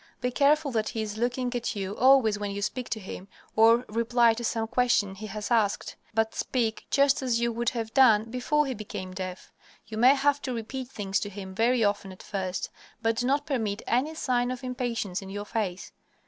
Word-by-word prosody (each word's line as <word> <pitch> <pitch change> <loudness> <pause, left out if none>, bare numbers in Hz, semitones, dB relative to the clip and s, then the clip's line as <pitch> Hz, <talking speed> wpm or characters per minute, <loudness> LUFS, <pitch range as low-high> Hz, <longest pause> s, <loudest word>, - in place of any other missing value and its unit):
Be 250 0 -1
careful 290 +2 +3
that 220 -2 0
he 225 -3 -3
is 215 0 -5
looking 245 +1 -1
at 240 0 -2
you 195 0 -3
always 255 -5 +5
when 205 -1 -3
you 200 0 -4
speak 250 +5 -3
to 220 - -2
him 190 -1 -8 0.3
or 230 +2 +5
reply 230 +1 +3
to 235 +2 -6
some 225 -1 -1
question 235 -5 +2
he 215 +3 -8
has 210 +2 -5
asked, 215 -4 +1 0.2
but 220 0 +1
speak 230 -4 -2
just 280 0 +3
as 245 -3 +1
you 235 0 +1
would 235 +1 0
have 225 -2 -4
done 225 -5 +5
before 300 +5 +1
he 265 - -2
became 205 -4 -7
deaf. 185 -1 -6 0.3
You 220 0 -6
may 255 +4 +7
have 285 +1 +2
to 255 - -3
repeat 250 +3 -5
things 200 -6 -2
to 205 - -4
him 190 -1 -8
very 230 +3 +2
often 205 -2 0
at 185 - -12
first, 190 -3 -3 0.3
but 225 0 +1
do 245 - 0
not 285 +2 +1
permit 225 -8 -2
any 275 +7 0
sign 245 -5 0
of 255 0 -5
impatience 240 -6 -3
in 190 - -9
your 205 +1 -5
face. 205 -5 -3
230 Hz, 210 wpm, -27 LUFS, 205-250 Hz, 0.3 s, may